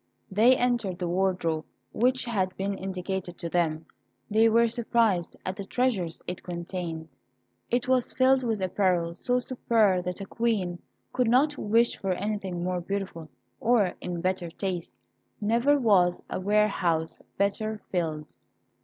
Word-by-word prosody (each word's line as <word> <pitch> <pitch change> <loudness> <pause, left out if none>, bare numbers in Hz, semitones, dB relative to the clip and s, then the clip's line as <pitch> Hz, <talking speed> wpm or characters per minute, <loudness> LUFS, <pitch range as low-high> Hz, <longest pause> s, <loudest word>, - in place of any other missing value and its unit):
They 230 +6 +5
entered 235 -7 0
the 180 - -2
wardrobe 175 -3 0 0.3
which 255 +3 +1
had 190 -6 -1
been 195 +1 -1
indicated 190 -1 -4
to 170 - -5
them; 160 -2 0 0.5
they 220 +2 +5
were 230 +1 +4
surprised 225 -6 +1
at 185 - -2
the 200 - -6
treasures 195 -7 -1
it 180 - -5
contained. 170 -2 -5 0.6
It 245 +1 0
was 255 -2 +2
filled 260 0 +4
with 225 -5 -1
apparel 180 -3 +1
so 245 +8 0
superb 225 -7 +1
that 180 +1 -3
a 195 - -5
Queen 195 -6 -1 0.3
could 250 -3 +2
not 285 +5 +4
wish 230 +1 +2
for 195 -1 0
anything 195 -3 -3
more 180 0 -1
beautiful, 185 -4 -4 0.3
or 220 -6 +3
in 175 -1 -4
better 185 -1 -1
taste. 180 0 -5 0.4
Never 235 +7 +3
was 190 -8 +3
a - - -2
warehouse 185 -5 +1 0.2
better 210 +2 0
filled. 155 -4 -2
195 Hz, 145 wpm, -27 LUFS, 175-230 Hz, 0.6 s, They